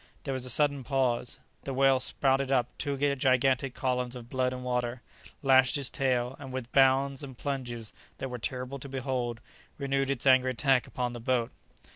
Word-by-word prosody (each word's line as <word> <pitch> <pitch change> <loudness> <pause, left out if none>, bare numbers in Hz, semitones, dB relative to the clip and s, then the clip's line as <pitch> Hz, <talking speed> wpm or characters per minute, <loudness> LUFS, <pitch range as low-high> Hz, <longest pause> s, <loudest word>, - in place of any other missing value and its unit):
There 135 - -3
was 130 -1 -3
a - - -1
sudden 145 +1 +2
pause. 125 -2 0 0.3
The 135 - -4
whale 135 0 +4
spouted 135 +1 +1
up 125 -2 +1
two 140 -2 -1 0.2
gigantic 130 0 +2
columns 125 -1 -1
of 120 -1 -10
blood 130 -1 +1
and 125 0 -6
water, 125 -1 -2 0.4
lashed 130 0 +5
its 140 -3 -2
tail, 125 -1 0
and, 135 -2 -8
with 130 -2 -5
bounds 135 0 +3
and 135 -4 -9
plunges 120 -6 -4 0.2
that 135 - -4
were 125 -1 -5
terrible 130 +3 -4
to 140 - -8
behold, 130 -3 -3 0.4
renewed 135 -1 0
its 140 -2 -1
angry 130 -1 +5
attack 130 0 +2
upon 125 -1 -3
the 120 - -6
boat. 120 -1 0
130 Hz, 180 wpm, -29 LUFS, 125-135 Hz, 0.4 s, lashed